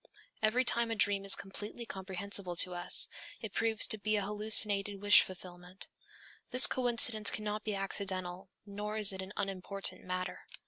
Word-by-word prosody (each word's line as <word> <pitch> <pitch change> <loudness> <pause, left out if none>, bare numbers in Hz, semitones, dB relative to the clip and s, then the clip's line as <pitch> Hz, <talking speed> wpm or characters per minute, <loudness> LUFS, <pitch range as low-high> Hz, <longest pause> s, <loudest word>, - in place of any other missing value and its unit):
Every 230 +4 -1
time 235 -1 -1
a 225 - -5
dream 200 -2 +1
is 195 - +5
completely 205 +4 -10
comprehensible 190 -2 -8
to 180 +1 +2
us, 175 0 +4 0.3
it 215 -3 -9
proves 225 -1 +2
to 220 - +2
be 215 +1 -3
an 205 - -3
hallucinated 205 -1 +3
wish 205 +1 +4
fulfillment. 180 0 -9 0.6
This 255 +1 +9
coincidence 235 -3 +2
cannot 210 0 -6
be 210 -2 -5
accidental, 190 -1 -6 0.2
nor 210 +1 -8
is 205 -2 +7
it 190 - -8
an 190 +1 -11
unimportant 195 0 -5
matter. 185 0 -7
200 Hz, 155 wpm, -29 LUFS, 190-215 Hz, 0.6 s, This